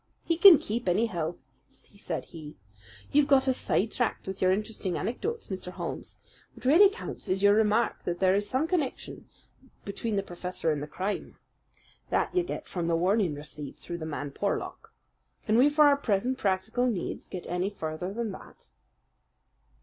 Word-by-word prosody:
"He 335 - +1
can 340 0 +10
keep, 230 -4 -3
anyhow," 175 -4 0 0.3
said 190 -5 -7
he. 155 -3 -10 0.6
"You've 290 0 +4
got 270 -2 +4
us 260 -1 +2
side 220 +4 0
tracked 245 -3 -1
with 190 0 -6
your 185 - +4
interesting 200 -3 -2
anecdotes, 445 - -3
Mr. 185 -2 -5
Holmes. - - -6 0.4
What - - -14
really 340 +10 +7
counts 405 - -7
is 190 +1 0
your 205 0 +7
remark 220 +2 +2
that 175 0 -2
there 185 -1 +4
is 205 +1 0
some 270 +5 0
connection 325 -7 -3 0.6
between 210 +2 -3
the 195 - 0
professor 180 -2 -3
and 150 -2 -2
the 150 - -5
crime. 190 +7 -4 0.7
That - - 0
you 365 - +3
get 350 - -5
from 175 -2 -3
the 170 - +2
warning 185 -1 +2
received 145 -1 -7
through 170 0 -7
the 160 - -5
man 145 -2 -4
Porlock. 200 +8 -3 0.5
Can 215 - +2
we 260 +5 +6
for 300 +1 +5
our 285 -1 +5
present 250 +1 0
practical 200 +6 0
needs 210 -8 -3
get 185 - -7
any 180 +3 -1
further 170 -1 -5
than 225 0 -3
that?" - - -13
200 Hz, 170 wpm, -28 LUFS, 180-250 Hz, 0.7 s, can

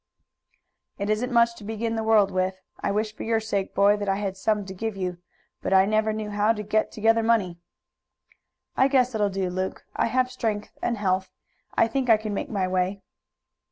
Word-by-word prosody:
"It 200 +1 -1
isn't 240 +4 -1
much 235 -1 +4
to 220 - -11
begin 225 +2 -3
the 225 - -1
world 220 -3 +4
with. 185 0 -1 0.2
I - - -1
wish 210 +1 -1
for - - -10
your 225 0 +1
sake, 205 -3 -3
boy, 200 +1 +5
that 205 -1 -3
I 195 - +2
had 195 -1 -3
some 210 +1 0
to 190 - -7
give 220 +2 -4
you, 180 -2 -3 0.4
but - - -1
I 190 0 +6
never 215 +1 +1
knew 215 -1 -4
how 210 +2 +2
to 210 -1 -5
get 215 +1 0
together 225 +1 +2
money." 215 -7 +1 1.2
"I 265 - +4
guess 255 -2 +2
it 220 - -1
will 205 - +3
do, 190 -2 -2
Luke. 185 +1 -4
I - - +2
have 230 - -6
health 255 0 +3
and 255 - -14
strength. 205 -4 -2 0.5
I 230 - +5
think 255 +2 -1
I 225 - +7
can 215 -1 -5
make - - -3
my 195 -4 0
way." 185 +2 -1
210 Hz, 210 wpm, -25 LUFS, 195-225 Hz, 1.2 s, I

